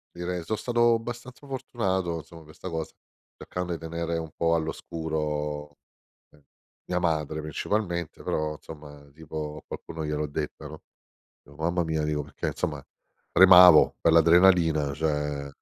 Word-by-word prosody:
Direi, 90 0 -4
so' 110 +6 -2
stato 120 -1 +2
abbastanza 120 +4 -9
fortunato, 95 -10 -2
insomma, 80 +1 -11
per 75 0 -16
sta 95 - -8
cosa, 80 -2 -4 0.4
cercando 90 -1 -5
i - - -3
tenere 85 +1 -3
un 80 -1 -5
po' 85 0 +2
all'oscuro, 75 -2 -3 0.5
ehm, 75 - -23 0.4
mia 90 0 -1
madre, 80 -2 -1
principalmente, 85 +2 -3
però, 75 0 -2
insomma, 75 -2 -12
tipo 75 0 -6
a - - -33
qualcuno 80 -1 -7
gliel'ho 75 0 -2
detta, 75 +1 -5
no, 75 0 -11 0.6
"o 70 - -17
mamma 85 +3 0
mia." 80 -1 -1
Dico, 75 -1 -1
perché 75 - -5
insomma, - - -3 0.5
tremavo 90 -3 +8
per - - +4
l'adrenalina, 85 -3 +5
cioè 75 -2 -2
80 Hz, 140 wpm, -26 LUFS, 75-90 Hz, 0.6 s, tremavo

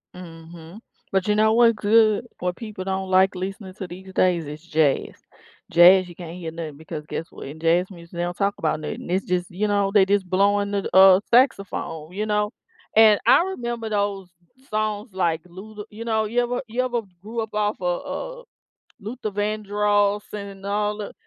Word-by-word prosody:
Mhm, 165 +1 -11 0.3
but 190 0 0
you 210 - +2
know 220 +1 +4
what's 230 0 +5
good 215 +2 +3
what 180 0 -2
people 215 -5 -7
don't 190 0 -3
like 190 +1 +4
listening 190 +1 -6
to 190 -2 -6
these 190 +2 -10
days 175 -4 +2
is 150 +1 -8
jazz. 155 -4 +1 0.6
Jazz, 180 +2 +7
you 175 - -12
can't 170 -1 -8
hear 165 -3 -6
nothing 160 -3 -7
because 155 -1 -8
guess 165 +1 -5
what? - - -10
In 150 +3 -9
jazz 170 +3 +2
music, 170 -3 -13
they 175 - -4
don't 175 0 -3
talk 200 +1 0
about 155 -1 -1
nothing. 155 - -6
It's 190 +2 0
just, 180 -1 -1
you 205 +4 -2
know, 200 -1 +1
they 200 -3 +6
just 195 -1 0
blowing 200 +2 +2
the, 200 -1 -2
uh, 190 0 +8
saxophone, 195 - +1
you 205 +3 -3
know, 210 0 0 0.4
and 215 -2 +7
I - - +6
remember 240 -11 -4
those 200 -3 -2 0.4
songs 215 0 -2
like, 170 -3 0
Luther 210 +4 -10
you 215 +2 -8
know, 220 -1 0
you 235 +3 +1
ever 245 0 -2
you 235 +3 -1
ever 245 -2 -1 0.2
grew 225 +4 -6
up 220 -1 -6
off 210 0 0
of, - - -3
uh, - - -18 0.6
Luther 215 +1 -5
Vandross 205 0 0
and 200 -2 -8
all 210 +1 -1
the 210 -1 -6
200 Hz, 190 wpm, -23 LUFS, 180-215 Hz, 0.6 s, uh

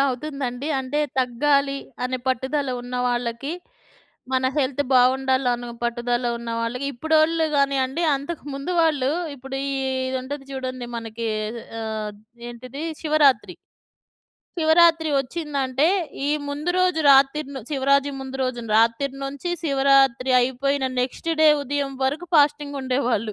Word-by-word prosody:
అవుతుందండి. 270 0 -4
అంటే 265 +3 -3 0.2
తగ్గాలి 275 +3 +1 0.3
అనే 255 0 -2
పట్టుదల 265 +2 -1
ఉన్నవాళ్ళకి, 245 +2 -2 0.8
మన 260 0 +1
హెల్త్ 280 0 +1
బావుండాలనో 255 -1 +2
పట్టుదల 240 +1 -1
ఉన్నవాళ్ళకి, 230 +2 -3
ఇప్పుడోళ్ళు 315 +4 +2
గానియండి. 275 +3 +1
అంతకు 285 +4 -6
ముందు 275 +6 -4
వాళ్ళు 285 -4 +2 0.3
ఇప్పుడు 270 +1 -7
ఈ 275 - -2 0.4
ఇది 260 - -2
ఉంటది 275 +1 -6
జూడండి 255 -2 -5
మనకి 230 0 -4 0.5
అహ్, 215 -1 -4 0.3
ఏంటిది? 255 +5 -8 0.2
శివరాత్రి. 300 -4 +3 1.0
శివరాత్రి 325 0 +4
ఒచ్చిందంటే 275 -1 -1 0.4
ఈ - - +1 0.2
ముందు 295 +5 -2
రోజు 365 -3 +2
రాతిరిను 275 0 +4
శివరాత్రి 280 0 +2
ముందు 265 0 -6
రోజు 255 -2 -2 0.2
రాత్రి 230 +5 +3
నుంచి 280 +5 -4
శివరాత్రి 270 -3 +3
అయిపోయిన 265 +2 0
నెక్స్ట్ 255 +6 -3
డే 310 - +7
ఉదయం 280 0 -2
వరకు 290 +7 -1
ఫాస్టింగ్ 290 -1 +3
ఉండేవాళ్ళు. 250 -5 0
270 Hz, 115 wpm, -23 LUFS, 250-285 Hz, 1.0 s, డే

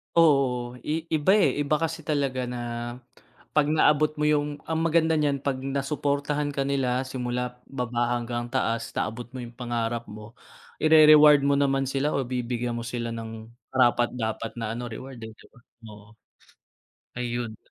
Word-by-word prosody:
Oo, 125 -6 +3
i 160 +1 -1
iba, 155 +5 +3
eh, 145 - +2
iba 145 +1 +1
kasi 165 0 -2
talaga 140 -4 0
na 125 0 -5 1.0
pag 150 -1 +3
naabot 150 0 +3
mo 150 - -2
yung 145 -1 0
ang 160 0 0
maganda 160 -1 +3
niyan 140 -2 0
pag 135 -2 -1
nasuportahan 145 +1 -1
ka 140 - -1
nila 130 -2 0
simula 125 -1 -4
baba 120 -2 -1
hanggang 120 0 -3
taas, 115 -3 -1
naabot 115 +1 -3
mo 130 - -6
yung 120 0 -10
pangarap 120 -1 -2
mo, 105 +2 -11 0.4
ire-reward 150 -2 +7
mo 140 0 +3
naman 135 -1 +2
sila 140 +2 0
o 140 - +1
bibigyan 120 -1 -3
mo 115 - -5
sila 120 -1 -3
ng 115 -1 -7 0.2
karapat-dapat 120 -3 +1
na 115 -2 -3
ano 120 - -5
reward, 130 +3 -8
eh, 110 - -10
'di - - -19
ba? 125 - -20 1.6
Ayun. 120 -2 -3
130 Hz, 155 wpm, -26 LUFS, 120-145 Hz, 1.6 s, ire-reward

